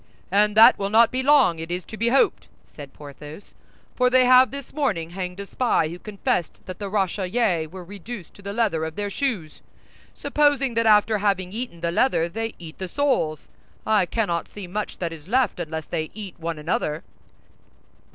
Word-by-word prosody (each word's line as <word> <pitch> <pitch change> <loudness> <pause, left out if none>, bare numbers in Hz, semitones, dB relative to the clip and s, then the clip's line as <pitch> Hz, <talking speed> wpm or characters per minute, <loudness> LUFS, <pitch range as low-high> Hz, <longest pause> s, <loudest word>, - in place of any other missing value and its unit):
"And 210 +2 +3
that 225 - +8
will 195 0 -1
not 225 +2 +5
be 255 - -1
long, 260 - +4
it 165 +1 -6
is 175 0 -4
to - - -9
be 230 +2 -1
hoped," 270 +3 +2 0.2
said 145 -3 -12
Porthos; 150 +4 -12 0.4
"for 250 0 +3
they 255 0 +5
have 255 +1 +7
this 280 -1 -8
morning 175 - -1
hanged 180 0 -5
a 200 - -5
spy 200 -8 0
who 175 +2 -8
confessed 200 -5 -3
that 185 -1 -8
the 200 -1 -4
Rochellais 190 -2 0
were 185 +3 -10
reduced 200 +1 -9
to - - -16
the 200 0 -6
leather 205 -7 0
of 160 0 -5
their 205 -1 -3
shoes. 200 - -3 0.5
Supposing 290 -4 +1
that 230 0 +1
after 210 0 +4
having 195 -3 0
eaten 225 -7 -6
the 170 -1 -1
leather 170 -4 +2
they 225 +6 -4
eat 160 -2 -11
the 190 - -4
soles, 245 - -1 0.3
I 210 -4 +3
cannot 175 -7 -1
see 205 -2 -9
much 205 +4 -4
that 170 -2 -3
is 155 -1 -12
left 250 -2 +1
unless 160 -2 -4
they 160 -2 -3
eat 205 -4 -7
one 165 -1 -4
another." 150 0 -2
200 Hz, 190 wpm, -23 LUFS, 170-230 Hz, 0.5 s, that